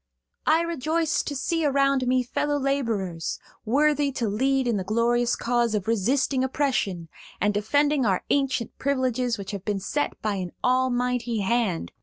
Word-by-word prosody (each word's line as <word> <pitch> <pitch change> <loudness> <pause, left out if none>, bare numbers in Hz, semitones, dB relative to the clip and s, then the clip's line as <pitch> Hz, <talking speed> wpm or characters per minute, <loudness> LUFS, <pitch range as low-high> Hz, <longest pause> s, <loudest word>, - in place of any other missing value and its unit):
"I 320 +2 +5
rejoice 325 -1 0
to 285 - -5
see 330 +4 -1
around 275 -2 +2
me 255 0 +3
fellow 290 +4 -1
laborers 230 - -1 0.3
worthy 290 +4 +2
to 235 -3 -1
lead 265 +5 +1
in 230 -3 +1
the 190 - -2
glorious 235 +4 +1
cause 235 -2 0
of 205 -1 -2
resisting 255 +5 +1
oppression, 255 - -1 0.3
and 205 +2 +2
defending 285 +7 +2
our 190 -5 +1
ancient 260 -4 0
privileges 255 -3 0
which 200 -1 -6
have 200 -3 -6
been 205 -1 -1
set 290 +9 -2
by 210 -2 -1
an 180 -2 -5
Almighty 250 -2 +1
hand. 195 - 0
250 Hz, 155 wpm, -25 LUFS, 215-275 Hz, 0.3 s, I